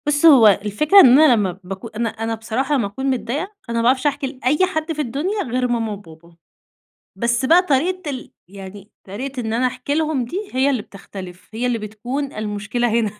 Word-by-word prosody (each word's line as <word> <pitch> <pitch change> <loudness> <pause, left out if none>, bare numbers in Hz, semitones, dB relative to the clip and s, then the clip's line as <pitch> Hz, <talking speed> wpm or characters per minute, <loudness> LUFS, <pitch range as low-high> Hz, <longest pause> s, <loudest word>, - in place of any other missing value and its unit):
بُص 295 +2 +2
هو 270 -9 +8
الفكرة 210 - +4
إن 260 -5 +8
أنا 310 -5 +6
لمّا 195 -5 -1
بكو 190 +5 -7
أنا 230 +1 -3
أنا 225 +1 -4
بصراحة 235 +6 -2
لمّا 235 -7 0
أكون 235 +7 -6
متضايقة، 265 +1 -1 0.3
أنا 235 - -2
ما - - +1
باعرفش 260 +3 +2
أحكي 285 -1 -1
لأي 265 +6 +1
حد 315 -3 -3
في 305 - -3
الدنيا 310 - -2
غير 250 0 -1
ماما 230 -2 -1
وبابا. 170 -3 -14 0.8
بس 240 +2 0
بقى 335 +6 +6
طريقة 355 +2 -1
ال 260 -3 -7 0.2
يعني 195 +2 -11
طريقة 255 +7 -6
إن 220 -1 -3
أنا 250 +2 +2
أحكي 255 +3 -4
لهُم 305 -5 0
دي، 390 - -5
هي 260 +2 +2
اللي 255 -6 0
بتختلف، 190 -3 -11
هي 235 +3 -2
اللي 245 -1 0
بتكون 240 +7 -5
المشكلة 215 +3 -2
هنا. 215 -3 -1
245 Hz, 195 wpm, -20 LUFS, 215-285 Hz, 0.8 s, هو